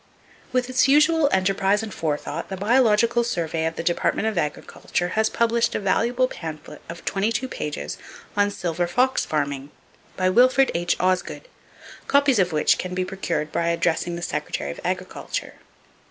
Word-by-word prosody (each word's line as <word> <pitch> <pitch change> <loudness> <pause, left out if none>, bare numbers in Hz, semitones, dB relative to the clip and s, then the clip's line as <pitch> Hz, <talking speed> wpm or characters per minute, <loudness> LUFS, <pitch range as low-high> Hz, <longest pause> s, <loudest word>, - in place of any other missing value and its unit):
With 250 -1 +1
its 255 +1 +3
usual 300 +2 +4
enterprise 195 +2 +2
and 215 -3 -6
forethought, 155 +1 -3
the 190 - -4
Biological 235 +2 +3
Survey 165 -8 -1
of 165 - -4
the - - -4
Department 175 +5 0
of 220 - -1
Agriculture 175 +2 -2
has 220 +3 +1
published 235 0 +1
a - - 0
valuable 235 +6 +1
pamphlet 160 -8 -8
of 170 0 -9
22 220 +6 0
pages 145 - -5 0.4
on 205 0 +3
"Silver 175 -3 -2
Fox 250 +8 +1
Farming," 145 -2 -2 0.5
by 185 - +1
Wilfred 255 +7 +4
H. 175 +1 0
Osgood, 185 - -1 0.6
copies 280 -4 +4
of 180 -2 +2
which 150 -1 +2
can 180 0 -4
be 185 0 0
procured 180 -5 -3
by 170 - 0
addressing 170 0 0
the 170 - -6
Secretary 70 - -3
of - - -9
Agriculture. - - -4
190 Hz, 155 wpm, -23 LUFS, 170-235 Hz, 0.6 s, usual